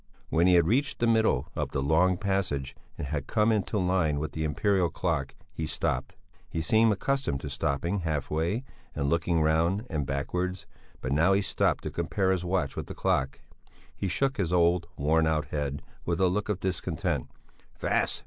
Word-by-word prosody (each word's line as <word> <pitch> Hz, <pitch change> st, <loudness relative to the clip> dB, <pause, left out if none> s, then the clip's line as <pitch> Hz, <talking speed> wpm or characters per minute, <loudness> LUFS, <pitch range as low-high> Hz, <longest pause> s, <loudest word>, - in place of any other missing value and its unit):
When 85 Hz, +2 st, +3 dB
he 90 Hz, -, +6 dB
had 85 Hz, -2 st, +5 dB
reached 135 Hz, -, +1 dB
the 120 Hz, -, +1 dB
middle 110 Hz, -, +2 dB
of -, -, -1 dB
the -, -, 0 dB
long 90 Hz, +5 st, +3 dB
passage 95 Hz, -9 st, -1 dB, 0.2 s
and -, -, -4 dB
had 70 Hz, -1 st, -3 dB
come 110 Hz, +1 st, +3 dB
into 105 Hz, 0 st, 0 dB
line 90 Hz, -5 st, +1 dB
with 75 Hz, 0 st, -3 dB
the 80 Hz, -, -3 dB
imperial 90 Hz, +4 st, +1 dB
clock, 80 Hz, -5 st, -2 dB, 0.2 s
he 80 Hz, -, -3 dB
stopped; -, -, -2 dB, 0.3 s
he -, -, -3 dB
seemed 110 Hz, +7 st, +4 dB
accustomed 130 Hz, -, 0 dB
to 70 Hz, -, -5 dB
stopping 80 Hz, +7 st, -1 dB
half 80 Hz, -5 st, -2 dB
way 85 Hz, +10 st, 0 dB, 0.3 s
and 70 Hz, 0 st, 0 dB
looking 85 Hz, -1 st, +2 dB
round 85 Hz, +7 st, +2 dB
and 75 Hz, -5 st, -1 dB
backwards; 90 Hz, +7 st, -2 dB, 0.4 s
but 65 Hz, -, -3 dB
now 80 Hz, +7 st, +4 dB
he 100 Hz, -, +3 dB
stopped -, -, +1 dB
to -, -, -4 dB
compare 95 Hz, +3 st, 0 dB
his 95 Hz, -2 st, 0 dB
watch 90 Hz, 0 st, -1 dB
with -, -, -5 dB
the -, -, -7 dB
clock; 65 Hz, 0 st, 0 dB, 0.5 s
he 100 Hz, -, -2 dB
shook 135 Hz, +9 st, 0 dB
his 90 Hz, -5 st, 0 dB
old, 85 Hz, -1 st, +3 dB
worn 80 Hz, +3 st, +3 dB
out 75 Hz, -2 st, 0 dB
head 70 Hz, -1 st, -3 dB, 0.2 s
with 85 Hz, -1 st, -1 dB
a 95 Hz, -1 st, +4 dB
look 105 Hz, +4 st, -1 dB
of 100 Hz, -3 st, -1 dB
discontent: 90 Hz, -3 st, -2 dB, 0.5 s
"Fast! -, -, 0 dB
85 Hz, 185 wpm, -28 LUFS, 75-95 Hz, 0.5 s, he